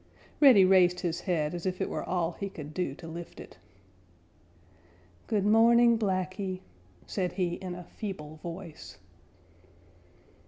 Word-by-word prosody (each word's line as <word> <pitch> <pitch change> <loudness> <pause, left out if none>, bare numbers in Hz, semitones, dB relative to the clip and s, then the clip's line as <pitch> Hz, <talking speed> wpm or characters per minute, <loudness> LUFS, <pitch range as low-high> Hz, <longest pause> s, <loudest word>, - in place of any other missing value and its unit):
Reddy 250 -10 +8
raised 180 -1 +4
his 170 -2 -2
head 165 -4 -1
as 175 +1 -4
if 185 -1 -2
it - - -1
were - - -4
all 175 -2 -1
he 200 +3 -5
could 150 -4 -9
do 170 -6 -2
to 165 - -11
lift 170 +1 -8
it. - - -12 1.7
"Good 205 -3 0
morning, 235 +2 +6
Blacky," 185 -1 -2 0.4
said 180 -3 -2
he 180 -3 -1
in 180 0 -6
a 180 - -8
feeble 160 -6 -7
voice. 165 - -9
180 Hz, 135 wpm, -29 LUFS, 170-195 Hz, 1.7 s, Reddy